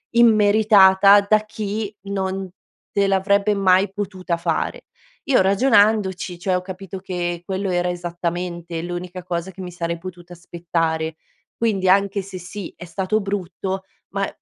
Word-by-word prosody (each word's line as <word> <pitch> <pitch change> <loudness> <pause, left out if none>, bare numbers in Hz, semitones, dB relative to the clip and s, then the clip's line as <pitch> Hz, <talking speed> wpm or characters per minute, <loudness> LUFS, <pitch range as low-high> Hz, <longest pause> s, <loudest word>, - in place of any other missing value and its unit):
immeritata 205 -3 +6
da 215 +1 +5
chi 215 -1 -4
non 195 -1 -3 0.4
te 200 0 +2
l'avrebbe 200 +2 +2
mai 190 0 +3
potuta 190 -3 -3
fare. 170 - -2 0.4
Io 265 -7 +4
ragionandoci, 200 -4 +2
cioè, 185 +1 0
ho 180 - 0
capito 190 0 -8
che 175 -2 -4
quello 190 +1 -2
era 175 0 0
esattamente 175 -1 -4
l'unica 175 +1 -6
cosa 175 +1 -3
che 190 +1 -10
mi 180 - -6
sarei 170 -1 -3
potuta 175 -1 -10
aspettare. 165 -2 -2 0.4
Quindi, 200 -5 0
anche 200 +1 +3
se, 190 -1 -8
sì, 180 +2 -8
è 175 - -10
stato 190 +5 -1
brutto 190 -1 -4 0.3
ma 195 0 -1
190 Hz, 135 wpm, -21 LUFS, 175-200 Hz, 0.4 s, immeritata